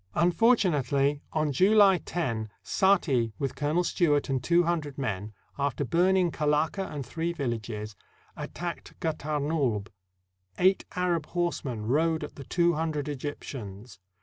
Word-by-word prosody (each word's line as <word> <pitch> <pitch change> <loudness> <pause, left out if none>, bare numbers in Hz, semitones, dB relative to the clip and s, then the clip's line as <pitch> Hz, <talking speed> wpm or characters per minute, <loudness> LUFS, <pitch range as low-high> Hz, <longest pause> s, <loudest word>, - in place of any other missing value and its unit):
Unfortunately, 155 - +3
on 155 -2 0
July 195 +4 +5
lo, 115 -11 -2 0.2
Saati, 140 - +2
with 135 -3 -2
Colonel 150 +4 0
Stewart 150 -6 +1
and 130 -2 -1
two 175 +5 +4
hundred 160 -5 -2
men, 105 -6 -3 0.3
after 140 -1 0
burning 180 +4 +3
Kalaka 155 +6 0
and 140 -3 -5
three 165 +6 -2
villages, 110 -7 -4 0.4
attacked - - -6
Gatarnulb. 150 -8 -1 0.7
Eight 190 +2 +3
Arab 175 -4 0
horsemen 145 -10 -2
rode 160 +6 +1
at 150 - -7
the 140 - -8
two 170 +3 +2
hundred 155 -2 -2
Egyptians. 125 -7 -6
150 Hz, 120 wpm, -28 LUFS, 130-170 Hz, 0.7 s, July